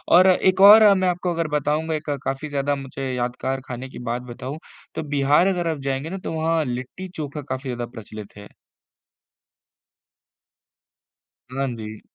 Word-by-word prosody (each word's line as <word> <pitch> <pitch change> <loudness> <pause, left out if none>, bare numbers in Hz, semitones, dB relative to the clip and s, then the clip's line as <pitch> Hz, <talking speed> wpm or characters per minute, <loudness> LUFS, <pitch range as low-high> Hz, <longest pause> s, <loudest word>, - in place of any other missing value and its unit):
और 185 +2 +7
एक 185 +1 +3
और 210 0 +9
मैं 185 -1 +1
आपको 180 0 -1 0.2
बताऊँगा 155 +2 0
एक 155 0 -5
काफ़ी 135 +3 -3
ज़्यादा 145 0 0
मुझे 135 -1 -5
यादगार 125 +2 -2
खाने 130 +1 -6
की - - -10
बात 120 +1 -1
बताऊँ, 130 +5 -6 0.4
तो - - -3
बिहार 145 +6 +4
अगर 175 -3 0
आप 155 - -3
जाएँगे 135 +4 -2
ना 195 - -4
तो - - -4
वहाँ 160 0 +1
लिट्टी-चोखा 145 +4 -5
काफ़ी 130 0 -4
ज़्यादा 120 -1 -3
प्रचलित 110 -3 -10
है। 100 0 -11 3.0
हाँ 135 +1 -1
जी। 110 -1 -8
140 Hz, 150 wpm, -23 LUFS, 130-165 Hz, 3.0 s, और